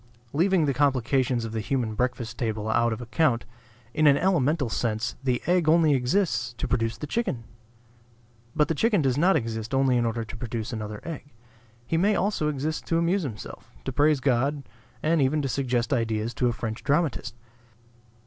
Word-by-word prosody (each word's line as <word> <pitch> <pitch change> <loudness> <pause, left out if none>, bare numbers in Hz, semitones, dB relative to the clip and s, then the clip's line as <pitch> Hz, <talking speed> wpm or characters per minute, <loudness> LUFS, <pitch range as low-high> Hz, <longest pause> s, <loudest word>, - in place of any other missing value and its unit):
Leaving 175 +2 +3
the 140 - +1
complications 130 -2 +1
of 115 - -5
the 110 - -2
human 115 0 -1
breakfast 125 0 -2
table 110 -3 -2
out 115 +1 +2
of 110 - -4
account, 120 0 +1 0.5
in 155 0 +3
an 140 -1 +6
elemental 155 -5 +2
sense, 115 0 -2
the 125 -2 0
egg 175 -3 +2
only 160 -2 +5
exists 130 -1 0
to 120 - -4
produce 115 0 0
the - - -5
chicken. 150 - -2 1.1
But 150 -1 +3
the - - 0
chicken 205 +1 +2
does 130 -2 +2
not 175 +6 +4
exist 115 -2 -2
only 135 -2 +3
in 120 - +1
order 115 0 -2
to 110 - -8
produce 115 0 -4
another 105 -1 -5
egg. 150 -3 -8 0.5
He 160 - 0
may 200 +5 +3
also 195 -7 0
exist 150 +2 -3
to 165 - +1
amuse 170 +4 +2
himself, 115 - -8
to - - -3
praise 145 +2 +3
God, 140 +2 +1 0.4
and 160 0 +3
even 135 +3 +2
to - - 0
suggest 125 0 0
ideas 115 -2 -1
to 125 - +1
a - - +2
French 115 -1 -5
dramatist. 145 -5 0
130 Hz, 180 wpm, -26 LUFS, 115-155 Hz, 1.1 s, an